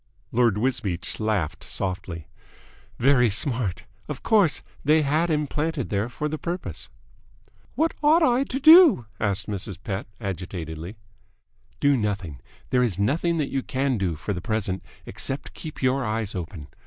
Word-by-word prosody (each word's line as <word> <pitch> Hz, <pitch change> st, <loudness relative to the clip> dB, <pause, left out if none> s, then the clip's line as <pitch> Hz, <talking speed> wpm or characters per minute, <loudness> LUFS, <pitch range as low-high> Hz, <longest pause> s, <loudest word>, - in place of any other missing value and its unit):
Lord 115 Hz, -3 st, +3 dB
Wisbeach 110 Hz, -7 st, -2 dB
laughed 100 Hz, -7 st, -1 dB
softly. 90 Hz, -4 st, -3 dB, 0.7 s
"Very 125 Hz, -2 st, +4 dB
smart. 115 Hz, -, +1 dB, 0.2 s
Of 150 Hz, -3 st, -6 dB
course 205 Hz, -, +3 dB, 0.2 s
they 155 Hz, +2 st, +4 dB
had 155 Hz, +4 st, +1 dB
him 150 Hz, -1 st, +1 dB
planted 150 Hz, -2 st, -2 dB
there 105 Hz, +3 st, 0 dB
for 150 Hz, +5 st, -3 dB
the 155 Hz, 0 st, -4 dB
purpose." 175 Hz, +2 st, -4 dB, 0.9 s
"What 325 Hz, +1 st, +1 dB
ought 310 Hz, +3 st, +5 dB
I 250 Hz, -2 st, +3 dB
to 265 Hz, 0 st, -3 dB
do?" 315 Hz, -, +8 dB
asked 100 Hz, -2 st, 0 dB
Mrs. 100 Hz, -3 st, -3 dB
Pett 100 Hz, -2 st, -4 dB
agitatedly. 90 Hz, -3 st, -5 dB, 0.8 s
"Do 145 Hz, 0 st, +4 dB
nothing. 100 Hz, -, -2 dB, 0.3 s
There 125 Hz, -, +3 dB
is 115 Hz, -8 st, +1 dB
nothing 155 Hz, -, +1 dB
that 150 Hz, -3 st, -1 dB
you 135 Hz, -, 0 dB
can 130 Hz, -2 st, -1 dB
do, 90 Hz, -4 st, -1 dB
for 100 Hz, +6 st, -4 dB
the 90 Hz, -, -5 dB
present, 105 Hz, -3 st, -2 dB, 0.2 s
except 135 Hz, +1 st, -2 dB
keep 155 Hz, -3 st, -8 dB
your 130 Hz, +1 st, +2 dB
eyes 110 Hz, -2 st, -1 dB
open. 85 Hz, -5 st, -6 dB
115 Hz, 150 wpm, -25 LUFS, 95-150 Hz, 0.9 s, do